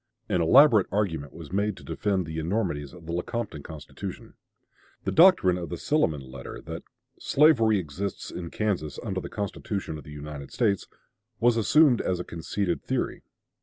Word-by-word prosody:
An 90 - +1
elaborate 115 - +6
argument 80 -9 -1
was 80 -2 -10
made 100 +1 0
to - - -12
defend 95 -4 -1
the 80 0 -4
enormities 80 -5 -1
of 85 -2 -13
the 85 - -5
Lecompton 105 -3 -3
Constitution. 75 -1 -8 0.7
The - - -1
doctrine 160 - +6
of 85 - -5
the 85 - -4
Silliman 75 - 0
letter, 65 -1 -8
that - - -7 0.4
"slavery 120 -8 +4
exists 95 +3 -4
in 85 -2 -6
Kansas 90 -10 -2
under 95 -4 -2
the - - -7
Constitution 100 -4 -4
of - - -12
the - - -13
United 75 -1 -8
States," 105 -6 +1 0.5
was 120 0 +4
assumed 125 +3 +5
as 90 -1 -1
a - - -2
conceded 85 +2 -2
theory. - - -2
95 Hz, 165 wpm, -27 LUFS, 80-110 Hz, 0.7 s, elaborate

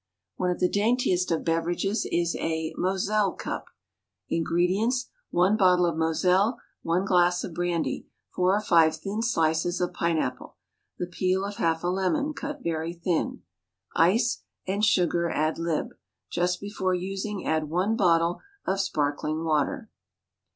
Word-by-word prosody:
One 180 - 0
of 180 - -1
the 180 - +3
daintiest 205 -3 +1
of 165 -2 -1
beverages 175 +5 0
is 170 0 +1
a 160 -1 -2
Moselle 195 +2 +1
Cup. - - -5 0.6
Ingredients: 185 +10 +1 0.2
One 185 +4 +3
bottle 180 -4 +4
of 170 -2 0
moselle. 180 +8 +2 0.2
One 175 +3 0
glass 180 -1 +3
of 170 - -6
brandy. 175 -1 -2 0.3
Four 185 +2 +3
or 210 - 0
five 165 -5 +4
thin 195 +7 -4
slices 170 -5 +1
of 180 - -1
pine 170 -1 0
apple. 125 -4 -3 0.4
The - - -2
peel 185 +2 0
of 205 0 -6
half 165 0 0
a - - 0
lemon, 195 +12 0
cut 290 -1 -6
very 165 0 -2
thin. 170 -1 -2 0.5
Ice; 225 +8 +3 0.2
and 200 +3 -1
sugar 175 -4 +3
ad 155 +1 0
lib. 165 -2 -2 0.4
Just 180 +1 0
before 190 -2 -1
using 195 +2 -4
add 155 -1 0
one 185 +7 +1
bottle 170 -3 +2 0.2
of 195 +1 0
sparkling 155 -3 -1
water. 165 - 0
180 Hz, 145 wpm, -26 LUFS, 165-195 Hz, 0.6 s, bottle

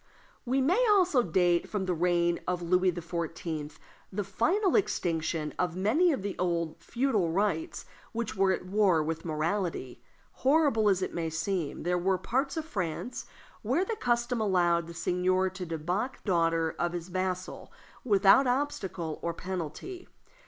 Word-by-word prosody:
We 260 +2 +1
may 360 - +3
also 365 -10 +4
date 175 -3 +2
from 205 -3 -2
the 185 - 0
reign 175 0 +1
of 180 -1 -1
Louis 180 +2 +3
XIV. 165 -3 -5 0.3
the 205 +1 -2
final 370 - +1
extinction 165 - 0
of 175 -2 0
many 245 - +3
of 265 -10 -2
the 200 -1 -3
old 170 -2 -1
feudal 235 -4 0
rights 210 - -1 0.3
which 230 -2 -3
were 195 -1 +3
at 185 - -2
war 185 -4 +3
with 160 +2 -4
morality. 160 -4 -2 0.4
Horrible 270 -6 +4
as 190 -1 +2
it - - -3
may 165 -1 -2
seem, 165 -1 -2
there 180 +1 +1
were 190 +1 +1
parts 270 - -1
of 315 - -2
France 205 - -4 0.3
where 370 - +1
the 450 - -2
custom 240 - 0
allowed 175 -4 +2
the 170 - -9
seigneur 185 +2 +1
to 185 -1 -6
debauch 175 - -2
the - - -21
daughter 165 -3 +1
of 175 0 0
his 175 0 -5
vassal 185 0 -3 0.3
without 205 +3 +5
obstacle 195 - -2
or 170 -1 -2
penalty. 185 - -6
185 Hz, 155 wpm, -29 LUFS, 170-235 Hz, 0.4 s, without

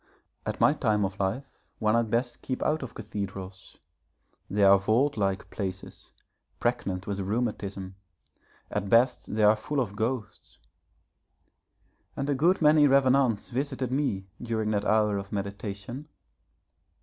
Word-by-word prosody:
At - - -3
my - - +5
time 105 -2 +1
of 95 +1 -5
life 100 +8 -4
one 105 0 +1
had 115 -1 +2
best 120 +2 -1
keep 130 - -3
out 155 +1 +1
of 130 - -7
cathedrals; 95 -3 -7 0.7
they 100 +1 +1
are 100 0 +7
vault 115 +9 +2
like 100 -3 -1
places, 95 -2 -6 0.5
pregnant 100 -6 -1
with 100 -1 -3
rheumatism 100 -2 -3 0.7
at 100 -1 -2
best 120 -1 +3
they 110 - +2
are 105 +1 +7
full 145 +5 -3
of 105 -6 -2
ghosts. 115 +1 -4 1.6
And 135 - -2
a - - +3
good 165 +6 +2
many 150 -1 +6
revenants 130 -5 +3
visited 130 -1 -2
me 130 -9 -1 0.2
during 110 -2 -1
that 105 -1 0
hour 105 -2 +2
of 100 0 -9
meditation. 100 +6 -5
110 Hz, 135 wpm, -28 LUFS, 100-130 Hz, 1.6 s, are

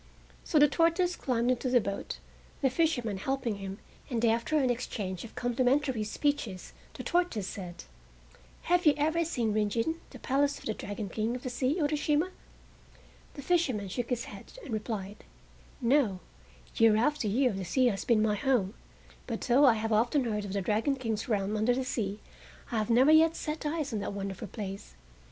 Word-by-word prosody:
So 315 - +1
the 295 0 +7
tortoise 335 +4 +2
climbed 245 -1 0
into 255 +1 -1
the 245 0 +5
boat, 200 -2 -4 0.5
the 265 - +4
fisherman 250 - 0
helping 240 0 -2
him, 195 0 -6 0.3
and 235 -3 0
after 235 +7 +2
an 260 -4 +3
exchange 200 -7 -4
of 230 - -11
complimentary 250 0 +1
speeches 215 -4 -2 0.2
the - - -6
tortoise 345 - 0
said: 180 -3 -7 0.8
"Have 355 -1 +2
you 295 - +6
ever 315 +3 +2
seen 240 -9 -1
Rin 210 -1 +1
Gin, 280 +11 -1
the 255 - -11
Palace 280 +3 +1
of - - -13
the 220 - -1
Dragon 205 0 -5
King 220 +5 -2
of 250 - -7
the 255 - -3
Sea, 255 +4 0
Urashima?" 300 +3 +1 1.0
The 280 - -7
fisherman 260 - +1
shook 235 +5 -3
his 240 -2 -1
head 200 -1 -11
and 250 - -6
replied; 210 -2 -4 0.6
"No; 240 -6 +2 0.6
year 225 -1 +6
after 245 +1 +1
year 245 +3 +2
the 190 0 -4
sea 255 +8 +2
has 205 -5 +1
been 220 -3 +3
my 215 -1 +2
home, 210 -3 +1 0.5
but 230 -3 -3
though 265 +4 +4
I 245 -4 +6
have 220 0 -1
often 240 +6 +2
heard 210 -3 -2
of 195 - -5
the 200 - 0
Dragon 220 +8 +1
King's 225 -3 -3
realm 205 -1 0
under 220 +3 +2
the 260 0 -2
sea 210 -5 -2 0.5
I 230 - +1
have 215 - -2
never 255 +6 +5
yet 320 +1 +6
set 305 0 -3
eyes 295 -4 -2
on 215 - -1
that 200 - -4
wonderful 195 -1 -5
place. 195 - -7
240 Hz, 185 wpm, -30 LUFS, 210-285 Hz, 1.0 s, the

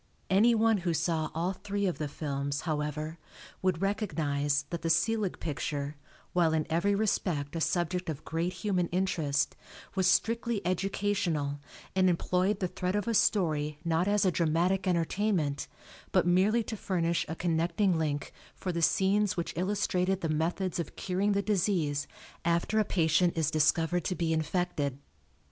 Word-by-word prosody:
Anyone 225 +1 +4
who 175 -2 -1
saw 160 -1 0
all 175 +4 0
three 200 +1 -3
of 180 -5 -1
the 150 - -1
films, 140 0 -3
however, 155 +1 -3 0.4
would 185 -1 0
recognize 145 -8 0
that 170 -1 -3
the 165 - -1
Selig 205 +4 +1
picture, 145 -1 -3 0.4
while 170 -3 +3
in 155 -1 +1
every 200 +5 +2
respect 175 -8 -1
a 165 - -2
subject 175 +1 0
of 155 -2 -5
great 165 +2 -1
human 185 -3 -1
interest, 160 -5 0 0.4
was 190 -1 +2
strictly 230 +3 +2
educational, 180 -6 -1 0.4
and 185 -1 +4
employed 180 +4 +1
the 185 - +1
thread 180 +2 -2
of 205 0 -1
a 230 - +1
story 155 -9 +2
not 165 +2 +1
as 205 0 +2
a 185 - +4
dramatic 175 +4 +1
entertainment, 170 -3 0 0.4
but - - +3
merely 195 +6 +3
to 220 - -5
furnish 170 -4 0
a 160 - -3
connecting 175 +3 +1
link 145 -2 -2 0.2
for 185 - -3
the 170 -1 -2
scenes 195 +4 +2
which 170 - -2
illustrated 190 0 0
the 165 - -1
methods 170 +4 -1
of 165 - -4
curing 195 +2 0
the 200 0 +1
disease 175 -8 0 0.4
after 170 +6 +1
a - - +4
patient 170 -2 +2
is 160 -1 +1
discovered 165 +2 +2
to 185 - -1
be 165 -2 0
infected. 160 -4 -1
175 Hz, 155 wpm, -30 LUFS, 160-195 Hz, 0.4 s, Anyone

